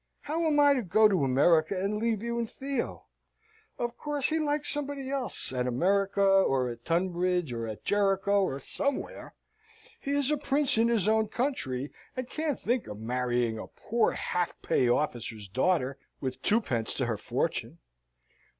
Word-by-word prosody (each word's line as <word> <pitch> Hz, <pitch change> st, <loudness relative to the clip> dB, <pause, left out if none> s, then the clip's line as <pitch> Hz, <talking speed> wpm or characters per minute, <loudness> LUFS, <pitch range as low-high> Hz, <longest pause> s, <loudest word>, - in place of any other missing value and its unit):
How 320 Hz, +3 st, -1 dB
am 295 Hz, -1 st, +3 dB
I 285 Hz, -1 st, +6 dB
to 260 Hz, -, 0 dB
go 215 Hz, +2 st, +5 dB
to 190 Hz, -8 st, +1 dB
America, 155 Hz, +7 st, +3 dB
and 200 Hz, +2 st, -1 dB
leave 225 Hz, -2 st, 0 dB
you 235 Hz, 0 st, -2 dB
and 230 Hz, -2 st, -2 dB
Theo? 275 Hz, -2 st, -4 dB, 0.7 s
Of 240 Hz, 0 st, -3 dB
course, 290 Hz, -1 st, -1 dB
he 320 Hz, +1 st, +1 dB
likes 295 Hz, -1 st, 0 dB
somebody 285 Hz, -2 st, -3 dB
else, 265 Hz, -, -3 dB
at 125 Hz, -1 st, -1 dB
America, 195 Hz, +10 st, +2 dB
or 190 Hz, -10 st, +4 dB
at 120 Hz, 0 st, -8 dB
Tunbridge, 175 Hz, -3 st, 0 dB
or 115 Hz, -1 st, -3 dB
at 110 Hz, -1 st, -7 dB
Jericho, 200 Hz, 0 st, +2 dB
or 140 Hz, -8 st, -1 dB
somewhere. 280 Hz, -, -3 dB, 0.6 s
He -, -, -6 dB
is 285 Hz, 0 st, +2 dB
a 300 Hz, -, +2 dB
prince 285 Hz, 0 st, +1 dB
in 230 Hz, -, +4 dB
his 225 Hz, -5 st, +2 dB
own 220 Hz, 0 st, +3 dB
country, 150 Hz, -, -2 dB, 0.3 s
and 255 Hz, -1 st, -3 dB
can't 305 Hz, 0 st, -2 dB
think 245 Hz, 0 st, -1 dB
of 105 Hz, -, -7 dB
marrying 120 Hz, 0 st, -1 dB
a -, -, -7 dB
poor 235 Hz, 0 st, 0 dB
half 180 Hz, -1 st, -2 dB
pay 125 Hz, -, +2 dB
officer's 120 Hz, -6 st, -1 dB
daughter, 135 Hz, -, 0 dB, 0.2 s
with 130 Hz, -1 st, -4 dB
twopence 130 Hz, -, +1 dB
to 130 Hz, -, 0 dB
her 115 Hz, -3 st, -1 dB
fortune. -, -, -2 dB
195 Hz, 170 wpm, -29 LUFS, -, 0.7 s, I